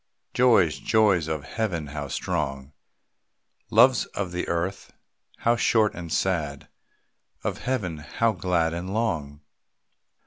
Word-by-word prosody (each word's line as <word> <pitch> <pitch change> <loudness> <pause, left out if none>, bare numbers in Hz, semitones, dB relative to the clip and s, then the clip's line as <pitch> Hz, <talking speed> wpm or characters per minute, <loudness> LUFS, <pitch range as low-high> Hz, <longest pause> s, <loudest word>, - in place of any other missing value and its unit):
Joys, 115 -11 +4
joys 100 -7 +3
of 80 -2 -3
Heaven 95 -5 -2
how 70 0 -5
strong! 70 -3 -3 1.0
Loves - - +5
of 95 -3 -2
the 90 0 -3
earth, 90 +3 -3 0.5
how 120 +1 +2
short 110 -2 +2
and 85 -1 -8
sad, 75 -7 -1 0.8
Of - - -2
Heaven 100 -12 -2
how 110 +10 0
glad 90 -4 0
and 90 +4 -4
long! 80 -11 -2
85 Hz, 115 wpm, -25 LUFS, 75-105 Hz, 1.0 s, Loves